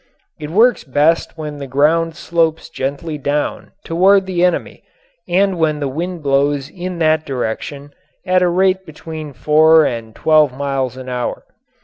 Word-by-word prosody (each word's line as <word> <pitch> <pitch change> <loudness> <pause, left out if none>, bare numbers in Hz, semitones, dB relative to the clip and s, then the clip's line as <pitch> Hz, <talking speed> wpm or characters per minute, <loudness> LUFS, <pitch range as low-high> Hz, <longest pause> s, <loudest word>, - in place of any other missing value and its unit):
It 150 -1 -6
works 225 +8 +3
best 150 +5 +1
when 150 -2 -6
the 140 -1 -7
ground 160 +5 +1
slopes 165 -1 -1
gently 145 +3 -4
down 145 +1 -2 0.2
toward 190 +3 +3
the 180 -2 -1
enemy 180 -1 -1 0.5
and 185 0 +1
when 155 -2 +1
the 145 - -2
wind 170 +4 -4
blows 140 0 +1
in 180 -1 -6
that 155 -1 +2
direction 140 +2 -5 0.3
at 185 -1 +2
a 180 - +3
rate 190 +1 +2
between 155 -2 -8
four 155 +4 +4
and 115 -3 -4
twelve 155 -4 +3
miles 135 -3 -2
an 130 0 -9
hour. 125 -1 -4
155 Hz, 150 wpm, -17 LUFS, 140-170 Hz, 0.5 s, four